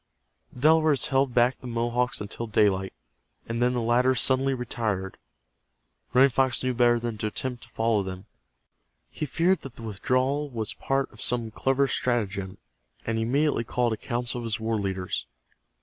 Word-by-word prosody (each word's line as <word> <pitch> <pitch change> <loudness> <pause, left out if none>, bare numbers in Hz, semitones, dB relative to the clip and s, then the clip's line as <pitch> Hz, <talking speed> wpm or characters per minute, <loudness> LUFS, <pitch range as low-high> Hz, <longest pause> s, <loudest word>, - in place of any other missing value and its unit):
The 125 - -12
Delawares 155 -2 +4
held 135 -1 +2
back 125 +1 +3
the 125 - -8
Mohawks 120 +1 0
until 110 +3 -5
daylight, 100 -3 +2 0.6
and 115 +1 -3
then 125 +1 +3
the 120 - -1
latter 125 +3 +3
suddenly 130 +2 +2
retired. 110 -6 -3 0.9
Running 130 +2 +5
Fox 130 0 +1
knew 130 0 0
better 120 -1 +3
than 115 -2 -4
to 110 - -1
attempt 125 +3 -4
to 120 - -15
follow 115 -2 +1
them. 95 0 -6 0.9
He 155 - -4
feared 175 +6 +2
that 135 -3 -10
the 115 - -11
withdrawal 130 +7 0
was 115 -4 -3
part 135 0 -1
of - - -11
some 120 -2 +1
clever 135 +4 +1
stratagem, 100 -7 -1 0.5
and 115 0 -1
he - - 0
immediately 140 +1 +1
called 120 0 0
a - - -1
council 120 +2 -2
of 120 - -6
his 110 -1 -2
war 110 0 -1
leaders. 95 -6 -3
120 Hz, 170 wpm, -26 LUFS, 110-130 Hz, 0.9 s, Running